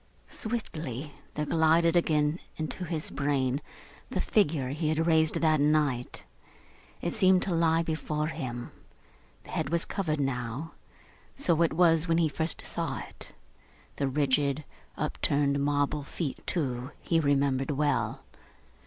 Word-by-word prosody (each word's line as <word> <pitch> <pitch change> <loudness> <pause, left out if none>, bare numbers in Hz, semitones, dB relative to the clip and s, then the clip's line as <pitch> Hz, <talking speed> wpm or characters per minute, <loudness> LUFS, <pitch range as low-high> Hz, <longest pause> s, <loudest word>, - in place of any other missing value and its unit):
Swiftly, 155 - -4 0.2
there 150 - -1
glided 165 +2 +3
again 155 -1 +2 0.2
into 160 +3 -4
his 155 -2 -3
brain 140 -1 0 0.5
the - - -2
figure 150 - +1
he 155 +3 -1
had 160 +1 +1
raised 160 -1 +3
that 155 -2 +3
night. 145 -4 +1 0.8
It 170 - -1
seemed 185 -3 +4
to 190 - -1
lie 165 0 +3
before 155 -1 -2
him. 120 -6 -5 0.7
The - - -12
head - - -1
was 170 +1 0
covered 155 -6 -2
now. 135 +2 -2 0.6
So 170 - +2
it 165 - +3
was 165 -1 +4
when 165 0 +3
he 165 -2 +3
first 160 +2 -1
saw - - -2
it. - - -9 0.6
The 140 - 0
rigid, 140 +1 +1 0.3
upturned, 140 -1 +1
marble 145 +1 +1
feet 140 0 -5
too, 130 -6 -1
he 165 - +1
remembered 140 -3 +1
well. 145 0 0
155 Hz, 135 wpm, -29 LUFS, 140-165 Hz, 0.8 s, seemed